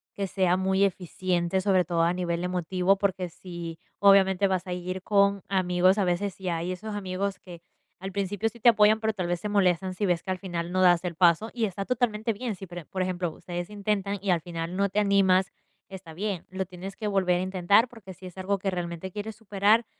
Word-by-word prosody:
que 200 Hz, -, -2 dB
sea 185 Hz, -1 st, +1 dB
muy 190 Hz, +1 st, +2 dB
eficiente. 185 Hz, -1 st, 0 dB
Sobre 185 Hz, -2 st, +3 dB
todo 170 Hz, 0 st, 0 dB
a 170 Hz, +1 st, +3 dB
nivel 175 Hz, -1 st, -2 dB
emotivo, 180 Hz, +2 st, +1 dB
porque 190 Hz, -3 st, -1 dB
si, 170 Hz, -1 st, -8 dB, 0.2 s
obviamente, 195 Hz, -1 st, +5 dB
vas 185 Hz, -2 st, -1 dB
a 180 Hz, -, -4 dB
ir 185 Hz, +1 st, -5 dB
con 200 Hz, -1 st, +2 dB
amigos 185 Hz, 0 st, +2 dB
a 195 Hz, -, +2 dB
veces, 190 Hz, +3 st, -1 dB
y 185 Hz, -, -2 dB
hay 170 Hz, +1 st, -2 dB
esos 205 Hz, +3 st, -5 dB
amigos 195 Hz, 0 st, -3 dB
que 175 Hz, -2 st, -12 dB, 0.4 s
al 190 Hz, 0 st, -6 dB
principio 200 Hz, +2 st, -1 dB
sí 230 Hz, 0 st, -8 dB
te 240 Hz, -, +7 dB
apoyan, 215 Hz, -1 st, +4 dB
pero 220 Hz, 0 st, +1 dB
tal 185 Hz, -4 st, -3 dB
vez 175 Hz, -1 st, -2 dB
se 210 Hz, -, -3 dB
molestan 185 Hz, -2 st, +2 dB
si 205 Hz, +2 st, -2 dB
ves 175 Hz, -2 st, +1 dB
que 190 Hz, -, -3 dB
al 185 Hz, -, -1 dB
final 175 Hz, -2 st, -4 dB
no 185 Hz, +1 st, +1 dB
das 175 Hz, -1 st, +5 dB
el 175 Hz, -2 st, -3 dB
paso 175 Hz, +5 st, +3 dB
y 235 Hz, -2 st, 0 dB
está 195 Hz, -1 st, -4 dB
totalmente 230 Hz, -1 st, 0 dB
bien. 220 Hz, 0 st, -4 dB
Si, 195 Hz, -, -9 dB
pere 175 Hz, -2 st, -9 dB
por 190 Hz, -, -4 dB
ejemplo, 180 Hz, -1 st, -1 dB
ustedes 175 Hz, +1 st, -6 dB
intentan 205 Hz, -1 st, -2 dB
y 200 Hz, -, -3 dB
al 175 Hz, -2 st, +3 dB
final 170 Hz, +2 st, -5 dB
no 200 Hz, -, +2 dB
te 200 Hz, +2 st, -1 dB
animas, 195 Hz, -2 st, +3 dB, 0.4 s
está 185 Hz, -4 st, -10 dB
bien. 195 Hz, -1 st, -3 dB
Lo 190 Hz, 0 st, -3 dB
tienes 185 Hz, +2 st, -9 dB
que 215 Hz, -, -4 dB
volver 185 Hz, -3 st, +2 dB
a -, -, -1 dB
intentar, 190 Hz, +5 st, +3 dB
porque 210 Hz, -6 st, -11 dB
si 185 Hz, -, -14 dB
es 180 Hz, 0 st, -10 dB
algo 195 Hz, +2 st, -1 dB
que 195 Hz, 0 st, -2 dB
realmente 175 Hz, 0 st, -4 dB
quieres 210 Hz, +2 st, -6 dB
superar, 210 Hz, +2 st, +2 dB
190 Hz, 225 wpm, -27 LUFS, 180-200 Hz, 0.4 s, te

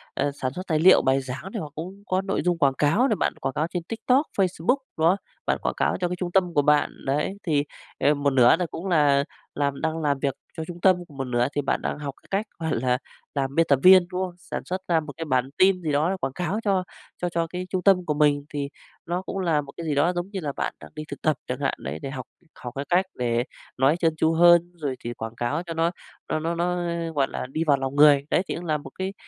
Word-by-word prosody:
à, 145 Hz, +1 st, 0 dB
sản 130 Hz, -2 st, -3 dB
xuất 185 Hz, +4 st, -7 dB
tài 155 Hz, -3 st, +1 dB
liệu, 185 Hz, +4 st, +7 dB
bài 135 Hz, +1 st, +2 dB
giảng 130 Hz, +2 st, -6 dB
này 225 Hz, -, -2 dB
hoặc 150 Hz, -, -7 dB
cũng 185 Hz, +6 st, -7 dB
có 185 Hz, 0 st, +1 dB
nội 195 Hz, 0 st, -1 dB
dung 175 Hz, -1 st, +2 dB
quảng 140 Hz, -5 st, +3 dB
cáo 165 Hz, -, +3 dB
này, 220 Hz, -, +1 dB
bạn -, -, 0 dB
quảng 135 Hz, -, -2 dB
cáo 155 Hz, +4 st, 0 dB
trên 175 Hz, 0 st, -4 dB
TikTok, 250 Hz, -, +1 dB
Facebook 190 Hz, -, +2 dB, 0.2 s
đó, 165 Hz, +4 st, +4 dB, 0.3 s
bạn -, -, +1 dB
quảng -, -, -1 dB
cáo -, -, +1 dB
cho 180 Hz, -, +2 dB
cái 180 Hz, -, -3 dB
trung 180 Hz, -1 st, -3 dB
tâm 180 Hz, -2 st, +2 dB
của 145 Hz, -, +4 dB
bạn. 150 Hz, +1 st, +3 dB
Đấy 150 Hz, +8 st, -1 dB
thì, 150 Hz, -4 st, +1 dB, 0.4 s
ờ, 145 Hz, +3 st, +4 dB
một 145 Hz, -1 st, +1 dB
nửa 125 Hz, -3 st, +6 dB
là 180 Hz, -, -1 dB
cũng 180 Hz, -, -5 dB
là 145 Hz, -5 st, +4 dB, 0.3 s
làm 140 Hz, -1 st, -1 dB
đang 160 Hz, 0 st, -1 dB
làm 145 Hz, -3 st, +1 dB
việc 140 Hz, -1 st, 0 dB, 0.2 s
cho 160 Hz, -, -3 dB
trung 175 Hz, +1 st, -9 dB
tâm, 185 Hz, 0 st, +6 dB
còn 145 Hz, -, -14 dB
một 135 Hz, -, -1 dB
nửa 120 Hz, -1 st, +1 dB
thì 145 Hz, -, +1 dB
bạn -, -, -1 dB
đang -, -, -3 dB
học 140 Hz, -2 st, -4 dB
cái -, -, -23 dB
cách, 200 Hz, +3 st, 0 dB, 0.2 s
gọi 115 Hz, -, 0 dB
là, 125 Hz, -1 st, +2 dB, 0.4 s
làm 135 Hz, -1 st, -1 dB
biên 165 Hz, -, +4 dB
tập 140 Hz, -, +4 dB
viên, 185 Hz, -1 st, +8 dB
đúng 180 Hz, -, -2 dB
không? 180 Hz, -1 st, -9 dB
Sản -, -, -6 dB
xuất 185 Hz, +1 st, -3 dB
ra 170 Hz, -2 st, +3 dB
một 150 Hz, -2 st, -7 dB
cái 165 Hz, -, -4 dB
bản 130 Hz, -3 st, +1 dB
tin 185 Hz, -1 st, +4 dB
gì 160 Hz, -3 st, -2 dB
đó 150 Hz, +4 st, +2 dB
để 195 Hz, -, 0 dB
quảng 130 Hz, -, -2 dB
cáo 180 Hz, +7 st, -2 dB
cho 195 Hz, -3 st, +2 dB, 0.4 s
cho 175 Hz, -, 0 dB
cho 170 Hz, -1 st, -1 dB
cái 180 Hz, +2 st, -5 dB
trung 185 Hz, -1 st, -2 dB
tâm 185 Hz, -3 st, +4 dB
của 150 Hz, -, 0 dB
mình, 145 Hz, -1 st, +2 dB
thì 140 Hz, -1 st, -2 dB, 0.4 s
nó 175 Hz, +1 st, -2 dB
cũng 190 Hz, -, -6 dB
là 165 Hz, -5 st, +2 dB
một 140 Hz, -1 st, -11 dB
cái 170 Hz, -, -5 dB
gì 150 Hz, -, 0 dB
đó 165 Hz, +6 st, +3 dB
giống 175 Hz, +1 st, -3 dB
như 195 Hz, -, -3 dB
là 150 Hz, -5 st, -3 dB
bạn -, -, -2 dB
đang -, -, -12 dB
đi 155 Hz, -, -5 dB
thực -, -, -8 dB
tập 155 Hz, -3 st, +1 dB
chẳng -, -, -3 dB
hạn, -, -, +1 dB
đấy 75 Hz, +3 st, -5 dB
để -, -, -5 dB
học 130 Hz, -2 st, -6 dB, 0.3 s
học 120 Hz, -1 st, -8 dB
cái 140 Hz, +1 st, -3 dB
cách 180 Hz, +2 st, +3 dB
để 120 Hz, -1 st, 0 dB, 0.3 s
nói 135 Hz, +5 st, +3 dB
trơn 165 Hz, -2 st, +2 dB
tru 160 Hz, +1 st, +2 dB
hơn 175 Hz, +1 st, +6 dB
rồi 145 Hz, -5 st, -3 dB
thì 120 Hz, -, -4 dB
quảng 115 Hz, 0 st, -7 dB
cáo 145 Hz, +8 st, -1 dB
cho 170 Hz, -2 st, -6 dB
nó 165 Hz, +1 st, +1 dB, 0.4 s
nó -, -, 0 dB
nó 165 Hz, +2 st, -2 dB
nó, 175 Hz, +1 st, 0 dB, 0.4 s
gọi 135 Hz, -2 st, +2 dB
là, -, -, -4 dB
đi 160 Hz, +3 st, 0 dB
vào 140 Hz, -2 st, +5 dB
lòng 135 Hz, 0 st, -3 dB
người. 145 Hz, -1 st, +6 dB
Đấy, -, -, +4 dB
thì -, -, -2 dB
cũng 175 Hz, -, -6 dB
là 155 Hz, -2 st, +1 dB
một 145 Hz, -, -11 dB
cái 190 Hz, +1 st, -2 dB
160 Hz, 275 wpm, -25 LUFS, 140-180 Hz, 0.4 s, viên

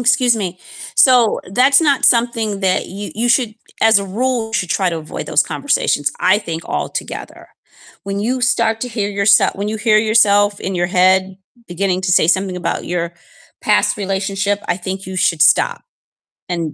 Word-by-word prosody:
Excuse 245 Hz, -1 st, +3 dB
me. 185 Hz, -4 st, -4 dB, 0.4 s
So 250 Hz, -4 st, +4 dB
that's 270 Hz, +6 st, +4 dB
not 285 Hz, -4 st, +1 dB
something 230 Hz, -4 st, +1 dB
that 185 Hz, -1 st, 0 dB
you 200 Hz, +2 st, -7 dB
you 235 Hz, +3 st, -1 dB
should 235 Hz, -2 st, +1 dB, 0.3 s
as 220 Hz, -2 st, +5 dB
a 200 Hz, -, -4 dB
rule 225 Hz, +3 st, -2 dB
should 185 Hz, -5 st, -2 dB
try 190 Hz, 0 st, +1 dB
to 165 Hz, -, -3 dB
avoid 155 Hz, -1 st, -7 dB
those -, -, +2 dB
conversations, 145 Hz, -, -1 dB
I 185 Hz, +3 st, +3 dB
think 165 Hz, -5 st, -6 dB
altogether. -, -, -6 dB, 0.6 s
When 200 Hz, 0 st, -4 dB
you 250 Hz, +5 st, -1 dB
start 230 Hz, -2 st, +1 dB
to 250 Hz, -, -3 dB
hear 210 Hz, -3 st, -3 dB
yoursel 200 Hz, 0 st, +3 dB
when 200 Hz, +2 st, -4 dB
you 220 Hz, -, -3 dB
hear 215 Hz, -1 st, +2 dB
yourself 205 Hz, -2 st, +3 dB
in 190 Hz, -, -4 dB
your 175 Hz, 0 st, 0 dB
head 185 Hz, +1 st, +2 dB, 0.3 s
beginning 185 Hz, +1 st, -1 dB
to 185 Hz, -, 0 dB
say 160 Hz, -, +4 dB
something 185 Hz, 0 st, 0 dB
about 180 Hz, -, -4 dB
your 170 Hz, -1 st, -3 dB, 0.5 s
past -, -, +2 dB
relationship, 195 Hz, 0 st, -2 dB
I -, -, 0 dB
think 190 Hz, +1 st, -6 dB
you 190 Hz, -, -7 dB
should 165 Hz, -3 st, +1 dB
stop -, -, +3 dB, 0.7 s
and 165 Hz, -4 st, -3 dB
200 Hz, 175 wpm, -17 LUFS, 185-225 Hz, 0.7 s, as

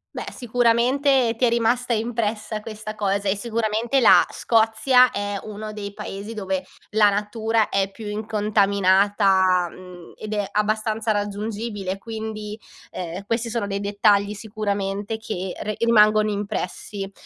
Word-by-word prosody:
Beh, -, -, -4 dB
sicuramente 245 Hz, +1 st, +2 dB
ti 250 Hz, -, +3 dB
è -, -, +4 dB
rimasta 235 Hz, +2 st, +1 dB
impressa 220 Hz, -1 st, -2 dB
questa 215 Hz, 0 st, -7 dB
cosa 200 Hz, -1 st, -1 dB
e 195 Hz, -, +2 dB
sicuramente 230 Hz, +3 st, 0 dB
la 230 Hz, -, +7 dB
Scozia 230 Hz, +3 st, +3 dB
è 205 Hz, 0 st, -3 dB
uno 215 Hz, 0 st, -7 dB
dei 200 Hz, -1 st, -6 dB
paesi 200 Hz, +4 st, -7 dB
dove 190 Hz, -3 st, -3 dB, 0.3 s
la 210 Hz, -1 st, +5 dB
natura 220 Hz, +2 st, 0 dB
è 195 Hz, 0 st, 0 dB
più 215 Hz, +1 st, -9 dB
incontaminata, 200 Hz, -3 st, +2 dB
mhmm, 180 Hz, -1 st, -13 dB
ed 215 Hz, 0 st, -6 dB
è 205 Hz, -2 st, -1 dB
abbastanza 215 Hz, +1 st, 0 dB
raggiungibile, 205 Hz, -1 st, -3 dB
quindi, 220 Hz, 0 st, -6 dB, 0.3 s
ehm, 180 Hz, +2 st, -6 dB
questi 230 Hz, +2 st, -1 dB
sono 225 Hz, -3 st, -2 dB
dei 200 Hz, 0 st, -3 dB
dettagli 205 Hz, 0 st, +2 dB
sicuramente 205 Hz, 0 st, -3 dB
che 190 Hz, -4 st, -5 dB
re 215 Hz, 0 st, -3 dB
rimangono 215 Hz, -2 st, +4 dB
impressi. 200 Hz, 0 st, -4 dB
210 Hz, 130 wpm, -23 LUFS, 200-225 Hz, 0.3 s, la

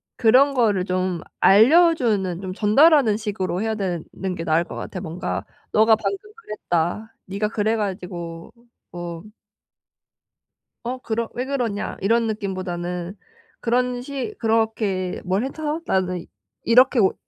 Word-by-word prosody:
그런 260 Hz, +5 st, +5 dB
거를 210 Hz, -8 st, +2 dB
좀 185 Hz, -1 st, -1 dB, 0.2 s
알려주는 225 Hz, -, +4 dB
좀 185 Hz, -1 st, -5 dB
전달하는 230 Hz, -, +4 dB
식으로 200 Hz, -4 st, -3 dB
해야 220 Hz, 0 st, -1 dB
되는 180 Hz, -6 st, -3 dB, 0.3 s
게 165 Hz, -, -4 dB
나을 160 Hz, +1 st, +2 dB
것 -, -, -9 dB
같아. 185 Hz, -, -6 dB
뭔가 165 Hz, +2 st, -4 dB, 0.3 s
"너가 220 Hz, +1 st, +6 dB
방금 395 Hz, -, -2 dB, 0.3 s
그랬다. 210 Hz, +2 st, -2 dB
니가 200 Hz, +3 st, -2 dB
그래 220 Hz, 0 st, 0 dB
가지고 180 Hz, -5 st, -5 dB, 0.4 s
뭐" 170 Hz, -1 st, -6 dB, 1.6 s
"어 255 Hz, +2 st, -2 dB
그러 230 Hz, -2 st, -3 dB
왜 250 Hz, -, -3 dB
그러냐?" 245 Hz, -7 st, -2 dB
이런 230 Hz, +3 st, +2 dB
느낌보다는 185 Hz, -3 st, -4 dB, 0.4 s
그런 245 Hz, +1 st, 0 dB
식 280 Hz, -, -5 dB
"그렇게 220 Hz, -5 st, 0 dB
뭘 190 Hz, +6 st, 0 dB
해서 300 Hz, +3 st, -3 dB
나는 185 Hz, -2 st, -1 dB, 0.4 s
이렇게 250 Hz, +1 st, +5 dB
뭐 190 Hz, -, +4 dB
210 Hz, 255 characters per minute, -22 LUFS, 185-235 Hz, 1.6 s, 너가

